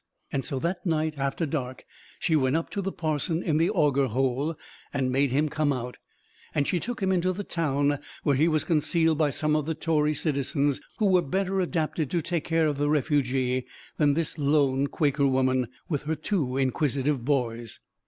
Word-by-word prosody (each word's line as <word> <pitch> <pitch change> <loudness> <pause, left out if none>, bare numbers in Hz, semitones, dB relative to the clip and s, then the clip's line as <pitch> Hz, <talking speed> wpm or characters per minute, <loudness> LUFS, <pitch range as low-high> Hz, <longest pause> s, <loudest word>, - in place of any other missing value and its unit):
And 135 - -1
so 140 -1 -2
that 175 +6 -2
night, 160 -3 0
after 140 +4 -1
dark, 130 -4 -4 0.3
she 160 - +1
went 130 -1 +2
up 165 - -2
to 200 - -2
the 195 0 -2
parson 160 +1 -1
in 155 -3 +1
the 165 +3 +3
"Auger 145 -8 +2
Hole," 135 +6 0 0.4
and 135 -2 0
made 135 +2 +2
him 145 +5 +1
come 150 0 0
out; 125 -2 -4 0.6
and 145 -1 +1
she 180 - +1
took 235 +2 -4
him 190 - +2
into 185 0 +2
the 195 +3 -4
town, 145 -5 0 0.2
where 145 - +3
he 150 +5 +3
was 155 -3 +2
concealed 165 0 +2
by 155 -2 +3
some 150 +2 0
of 155 -1 -1
the 160 - -1
Tory 155 -1 +1
citizens, 140 -1 0 0.2
who 215 - +1
were 185 -2 +4
better 190 +4 0
adapted 160 -4 -1
to 175 - 0
take 170 -1 -2
care 165 -1 +2
of 145 -2 -1
the 145 0 +1
refugee 130 -4 +1 0.3
than 145 -2 +3
this 165 -1 -2
lone 140 -2 +2
Quaker 140 -2 +1
woman 130 -1 +2 0.2
with 150 -6 -1
her 160 +1 0
two 150 -5 -1
inquisitive 135 0 0
boys. 120 -5 -1
150 Hz, 195 wpm, -27 LUFS, 135-165 Hz, 0.6 s, were